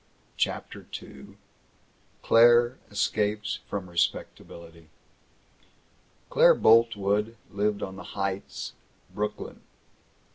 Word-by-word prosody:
CHAPTER -, -, -3 dB
II 70 Hz, -, -14 dB, 0.9 s
CLAIRE 120 Hz, +2 st, +5 dB
ESCAPES 105 Hz, 0 st, -1 dB
FROM 100 Hz, -2 st, -5 dB
RESPECTABILITY 85 Hz, -1 st, -4 dB, 1.4 s
Claire -, -, +6 dB
Boltwood 110 Hz, -1 st, +3 dB
lived 105 Hz, 0 st, -1 dB
on 95 Hz, 0 st, -6 dB
the -, -, -10 dB
Heights, 100 Hz, 0 st, -4 dB, 0.4 s
Brooklyn. 105 Hz, 0 st, -5 dB
105 Hz, 75 wpm, -27 LUFS, 95-110 Hz, 1.4 s, Claire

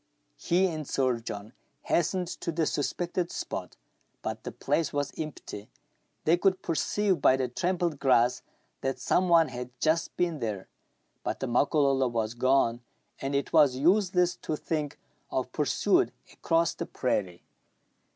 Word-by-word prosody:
He 180 Hz, +3 st, +2 dB
and 155 Hz, -5 st, -3 dB
Sir 130 Hz, -3 st, +1 dB
John 105 Hz, 0 st, -7 dB, 0.3 s
hastened 180 Hz, +2 st, +1 dB
to 170 Hz, -, -4 dB
the 160 Hz, 0 st, 0 dB
suspected 175 Hz, +4 st, -1 dB
spot. -, -, -5 dB, 0.5 s
But -, -, -4 dB
the -, -, -4 dB
place 165 Hz, -, 0 dB
was 145 Hz, -1 st, -1 dB
empty: 140 Hz, -9 st, -7 dB, 0.6 s
they 165 Hz, +3 st, +5 dB
could 190 Hz, +1 st, +1 dB
perceive 185 Hz, +4 st, 0 dB
by 130 Hz, -, +5 dB
the 130 Hz, -1 st, 0 dB
trampled 175 Hz, +2 st, -1 dB
grass 125 Hz, -2 st, +3 dB, 0.4 s
that 135 Hz, 0 st, -1 dB
some 185 Hz, 0 st, +1 dB
one 165 Hz, -2 st, +5 dB
had 125 Hz, -1 st, -6 dB
just 160 Hz, +1 st, +1 dB
been 170 Hz, -4 st, 0 dB
there; 105 Hz, -5 st, -3 dB, 0.6 s
but -, -, -3 dB
the -, -, -2 dB
Makololo 135 Hz, +1 st, +2 dB
was 115 Hz, -2 st, -1 dB
gone, 120 Hz, -1 st, +2 dB, 0.4 s
and 135 Hz, +1 st, -2 dB
it 140 Hz, -, -1 dB
was 145 Hz, -5 st, +6 dB
useless 180 Hz, +4 st, +3 dB
to 155 Hz, -, -3 dB
think 150 Hz, -2 st, -3 dB, 0.3 s
of -, -, -2 dB
pursuit -, -, +2 dB, 0.2 s
across 165 Hz, 0 st, +1 dB
the -, -, -5 dB
prairie. 95 Hz, -8 st, -2 dB
150 Hz, 145 wpm, -28 LUFS, 125-170 Hz, 0.6 s, was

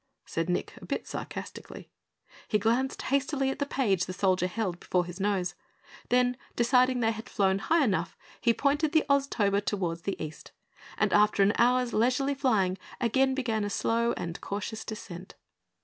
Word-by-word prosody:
said 165 Hz, +1 st, -2 dB
Nick, 180 Hz, -, -1 dB
a -, -, -11 dB
bit -, -, -3 dB
sarcastically. -, -, -7 dB, 0.6 s
He 215 Hz, -, +2 dB
glanced 235 Hz, +6 st, 0 dB
hastily 275 Hz, 0 st, +1 dB
at 270 Hz, -, -6 dB
the 285 Hz, -, -1 dB
page 200 Hz, -11 st, +1 dB
the 185 Hz, -, -4 dB
soldier 185 Hz, -1 st, +2 dB
held 185 Hz, -3 st, -3 dB
before 180 Hz, -1 st, 0 dB
his 175 Hz, +1 st, -8 dB
nose. 190 Hz, -3 st, 0 dB, 0.6 s
Then, 250 Hz, 0 st, +3 dB, 0.2 s
deciding 250 Hz, +1 st, +3 dB
they 225 Hz, -1 st, +3 dB
had 220 Hz, 0 st, -7 dB
flown 195 Hz, -1 st, +2 dB
high 320 Hz, +9 st, +2 dB
enough, 190 Hz, -8 st, -1 dB, 0.2 s
he 235 Hz, -, +4 dB
pointed 290 Hz, +5 st, +1 dB
the 315 Hz, -, +4 dB
Oztober 210 Hz, -8 st, +2 dB
toward 180 Hz, -5 st, -2 dB
the 195 Hz, +3 st, -4 dB
east 155 Hz, 0 st, -8 dB, 0.4 s
and -, -, +1 dB
after 210 Hz, -1 st, +4 dB
an 200 Hz, +2 st, +4 dB
hour's 250 Hz, 0 st, +3 dB
leisurely 255 Hz, +5 st, +2 dB
flying, 210 Hz, -9 st, +1 dB, 0.2 s
again 265 Hz, +2 st, +2 dB
began 230 Hz, -5 st, -1 dB
a 205 Hz, -, -2 dB
slow 230 Hz, +3 st, +1 dB
and 170 Hz, -2 st, -5 dB
cautious 210 Hz, +2 st, -4 dB
descent. 185 Hz, -4 st, -8 dB
220 Hz, 165 wpm, -29 LUFS, 190-255 Hz, 0.6 s, he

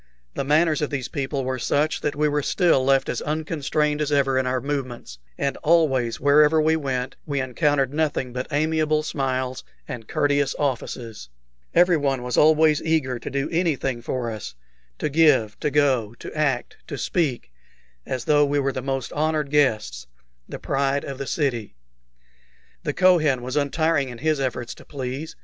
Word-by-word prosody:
The -, -, -2 dB
manners 155 Hz, +2 st, +2 dB
of 150 Hz, -, 0 dB
these 135 Hz, -4 st, -3 dB
people 140 Hz, 0 st, -3 dB
were 130 Hz, 0 st, -2 dB
such 145 Hz, +5 st, 0 dB
that 150 Hz, -1 st, -1 dB
we 150 Hz, +1 st, +2 dB
were 150 Hz, 0 st, 0 dB
still 165 Hz, -3 st, +2 dB
left 135 Hz, 0 st, +3 dB
as -, -, -2 dB
unconstrained 150 Hz, -1 st, -1 dB
as 150 Hz, 0 st, -1 dB
ever 135 Hz, -2 st, +2 dB
in 130 Hz, -, -1 dB
our 125 Hz, 0 st, 0 dB
movements, 125 Hz, -, -5 dB, 0.2 s
and 140 Hz, 0 st, -1 dB
always, 140 Hz, -8 st, +2 dB
wherever 150 Hz, +3 st, +5 dB
we 160 Hz, +1 st, +3 dB
went, 130 Hz, -4 st, -3 dB
we 140 Hz, -2 st, -1 dB
encountered 135 Hz, +1 st, +1 dB
nothing 150 Hz, -5 st, -1 dB
but 125 Hz, 0 st, -4 dB
amiable 155 Hz, 0 st, +1 dB
smiles 130 Hz, -3 st, -2 dB, 0.2 s
and 115 Hz, -3 st, -7 dB
courteous 145 Hz, -1 st, +1 dB
offices. 120 Hz, -, -4 dB, 0.5 s
Everyone 150 Hz, -7 st, +3 dB
was 125 Hz, -1 st, -2 dB
always 155 Hz, -1 st, +4 dB
eager 140 Hz, -6 st, 0 dB
to -, -, -6 dB
do 140 Hz, +1 st, -1 dB
anything 150 Hz, -8 st, 0 dB
for 120 Hz, 0 st, -3 dB
us 105 Hz, -, -7 dB, 0.4 s
to -, -, -1 dB
give, 140 Hz, -9 st, +3 dB
to 150 Hz, -, 0 dB
go, 130 Hz, -6 st, +1 dB
to -, -, -9 dB
act, 135 Hz, -5 st, -1 dB
to 140 Hz, -, -5 dB
speak, 130 Hz, -, -1 dB, 0.5 s
as 125 Hz, -, -4 dB
though 145 Hz, -1 st, +4 dB
we 145 Hz, 0 st, +1 dB
were 135 Hz, -1 st, +1 dB
the 130 Hz, -, -3 dB
most 135 Hz, -1 st, -3 dB
honored 155 Hz, -1 st, 0 dB
of -, -, -16 dB
guests, 110 Hz, -, +1 dB, 0.4 s
the -, -, -5 dB
pride 140 Hz, +1 st, 0 dB
of 135 Hz, -1 st, -6 dB
the 140 Hz, -, -4 dB
city. 120 Hz, -, -2 dB, 1.1 s
The -, -, -2 dB
Kohen 155 Hz, -9 st, +3 dB
was 130 Hz, +2 st, -4 dB
untiring 145 Hz, -1 st, +1 dB
in 120 Hz, -, -8 dB
his 155 Hz, +2 st, 0 dB
efforts 130 Hz, -3 st, -3 dB
to -, -, -15 dB
please. 135 Hz, +2 st, -6 dB
140 Hz, 170 wpm, -23 LUFS, 130-150 Hz, 1.1 s, wherever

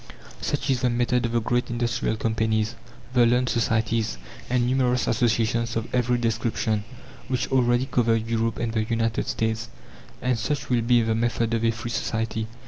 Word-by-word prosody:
Such 140 Hz, -1 st, -1 dB
is 125 Hz, -2 st, 0 dB
the 125 Hz, -, +2 dB
method 120 Hz, 0 st, +1 dB
of -, -, -5 dB
the 120 Hz, -, +3 dB
great 120 Hz, +2 st, 0 dB
industrial 120 Hz, -1 st, -1 dB
companies, 110 Hz, 0 st, 0 dB, 0.4 s
the 125 Hz, -2 st, +5 dB
learned 125 Hz, +1 st, +2 dB
societies, 115 Hz, -, 0 dB, 0.3 s
and 125 Hz, -1 st, +2 dB
numerous 125 Hz, -1 st, +2 dB
associations 115 Hz, -1 st, +1 dB
of 115 Hz, 0 st, -3 dB
every 125 Hz, -1 st, +2 dB
description, 115 Hz, -2 st, 0 dB, 0.4 s
which 130 Hz, 0 st, -2 dB
already 120 Hz, -1 st, +3 dB
cover 115 Hz, -3 st, +2 dB
Europe 115 Hz, 0 st, -1 dB
and 115 Hz, -1 st, -2 dB
the 110 Hz, -, +1 dB
United 115 Hz, 0 st, -1 dB
States. 110 Hz, 0 st, -1 dB, 0.5 s
And 125 Hz, -2 st, 0 dB
such 145 Hz, +3 st, -2 dB
will 120 Hz, -1 st, +3 dB
be 120 Hz, 0 st, +3 dB
the 110 Hz, 0 st, +1 dB
method 115 Hz, 0 st, 0 dB
of 115 Hz, 0 st, 0 dB
a 115 Hz, -, +4 dB
free 115 Hz, +1 st, -4 dB
society. 110 Hz, -1 st, -2 dB
115 Hz, 170 wpm, -25 LUFS, 110-125 Hz, 0.5 s, the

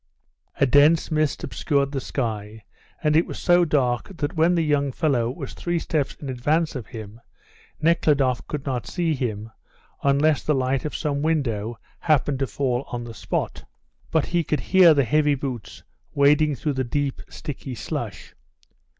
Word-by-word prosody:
A -, -, +5 dB
dense 145 Hz, +6 st, +4 dB
mist 155 Hz, -1 st, 0 dB
obscured 140 Hz, -2 st, 0 dB
the 135 Hz, -2 st, -3 dB
sky, 110 Hz, -5 st, -4 dB, 0.4 s
and 150 Hz, -1 st, +3 dB
it 165 Hz, -, +4 dB
was -, -, -6 dB
so 175 Hz, 0 st, +4 dB
dark 140 Hz, +4 st, 0 dB
that 145 Hz, +2 st, -2 dB
when 165 Hz, +2 st, +3 dB
the 165 Hz, -, +2 dB
young 145 Hz, -2 st, +1 dB
fellow 125 Hz, -5 st, +1 dB
was 135 Hz, +1 st, -6 dB
three 175 Hz, 0 st, -2 dB
steps 155 Hz, -3 st, -1 dB
in 145 Hz, -, -9 dB
advance 150 Hz, +6 st, 0 dB
of 125 Hz, -5 st, -5 dB
him 110 Hz, 0 st, -9 dB, 0.6 s
Nekhludoff 145 Hz, -5 st, +2 dB
could 145 Hz, -2 st, -4 dB
not 130 Hz, -4 st, -3 dB
see 170 Hz, -3 st, 0 dB
him 110 Hz, -5 st, -3 dB, 0.5 s
unless 140 Hz, +1 st, +3 dB
the 150 Hz, -, +1 dB
light 130 Hz, 0 st, 0 dB
of 150 Hz, -, -4 dB
some 145 Hz, -2 st, -1 dB
window 120 Hz, -8 st, -1 dB, 0.2 s
happened 145 Hz, -3 st, +1 dB
to 135 Hz, -, 0 dB
fall 125 Hz, +3 st, -1 dB
on 120 Hz, -1 st, -5 dB
the 120 Hz, -1 st, -8 dB
spot, -, -, -3 dB, 0.5 s
but 160 Hz, -2 st, +1 dB
he 175 Hz, -1 st, 0 dB
could 150 Hz, 0 st, -1 dB
hear 180 Hz, -4 st, +8 dB
the 140 Hz, -2 st, +3 dB
heavy 150 Hz, +3 st, +3 dB
boots 130 Hz, -6 st, -6 dB, 0.3 s
wading 145 Hz, +1 st, +4 dB
through 145 Hz, +4 st, -2 dB
the 130 Hz, -1 st, -1 dB
deep, 140 Hz, +2 st, -2 dB
sticky 135 Hz, -3 st, -7 dB
slush. -, -, -5 dB
140 Hz, 165 wpm, -24 LUFS, 125-155 Hz, 0.6 s, hear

